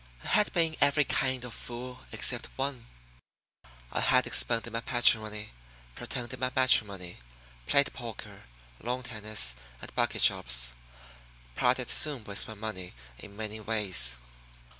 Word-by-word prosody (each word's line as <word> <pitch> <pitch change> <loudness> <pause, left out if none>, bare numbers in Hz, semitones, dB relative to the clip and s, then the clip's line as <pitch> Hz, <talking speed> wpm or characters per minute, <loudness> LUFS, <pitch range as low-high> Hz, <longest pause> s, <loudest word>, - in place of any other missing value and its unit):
I - - -6
had 210 -1 +3
been 165 -3 +1
every 145 +1 +4
kind 130 -2 0
of 120 - -7
fool 125 +2 -8
except - - -1
one. 135 -3 -4 1.0
I - - -2
had - - +3
expended 115 -1 +1
my 115 - -2
patrimony, 110 -3 +2 0.4
pretended 120 - -6
my 130 0 -1
matrimony, 100 -8 +2 0.5
played 140 0 +3
poker, 115 -4 -9 0.3
lawn 125 +2 -4
tennis, 110 - 0 0.2
and - - -10
bucket - - 0
shops - - +3 0.8
parted - - +1
soon 145 -7 +4
with 100 -1 0
my 110 - -8
money 100 - -6 0.2
in 100 -1 -12
many 110 0 -6
ways. 100 - +4
115 Hz, 130 wpm, -29 LUFS, 105-130 Hz, 1.0 s, every